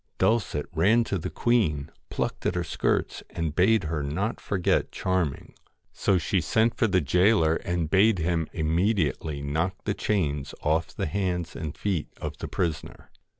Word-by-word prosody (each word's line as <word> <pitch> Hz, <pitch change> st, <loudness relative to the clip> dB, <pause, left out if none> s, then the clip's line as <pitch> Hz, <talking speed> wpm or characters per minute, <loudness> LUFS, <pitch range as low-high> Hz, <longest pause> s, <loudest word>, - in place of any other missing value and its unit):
Dulcet 105 Hz, -10 st, +1 dB
ran 105 Hz, +9 st, +4 dB
to 100 Hz, -4 st, -2 dB
the 90 Hz, +3 st, -4 dB
queen, 80 Hz, -11 st, +1 dB, 0.2 s
plucked -, -, -2 dB
at -, -, 0 dB
her 90 Hz, -, 0 dB
skirts, -, -, -1 dB
and 80 Hz, -3 st, -3 dB
bade 100 Hz, +4 st, +4 dB
her 80 Hz, -2 st, -2 dB
not 90 Hz, +11 st, -2 dB
forget 95 Hz, -3 st, 0 dB
Charming. 95 Hz, -7 st, -2 dB, 0.4 s
So 100 Hz, -2 st, +2 dB
she 85 Hz, -, 0 dB
sent 115 Hz, +1 st, +2 dB
for 115 Hz, -, +1 dB
the 95 Hz, -3 st, +2 dB
gaoler 80 Hz, -, +3 dB
and 85 Hz, -2 st, -2 dB
bade 95 Hz, +5 st, +4 dB
him 85 Hz, -1 st, 0 dB
immediately 80 Hz, -3 st, 0 dB
knock 80 Hz, +6 st, -1 dB
the 100 Hz, -, 0 dB
chains 75 Hz, -10 st, -1 dB
off 80 Hz, +2 st, +1 dB
the -, -, -4 dB
hands 90 Hz, -1 st, -2 dB
and 75 Hz, -3 st, -5 dB
feet 95 Hz, -7 st, -1 dB
of -, -, -5 dB
the -, -, -4 dB
prisoner. 80 Hz, -3 st, -4 dB
85 Hz, 160 wpm, -26 LUFS, 80-100 Hz, 0.4 s, ran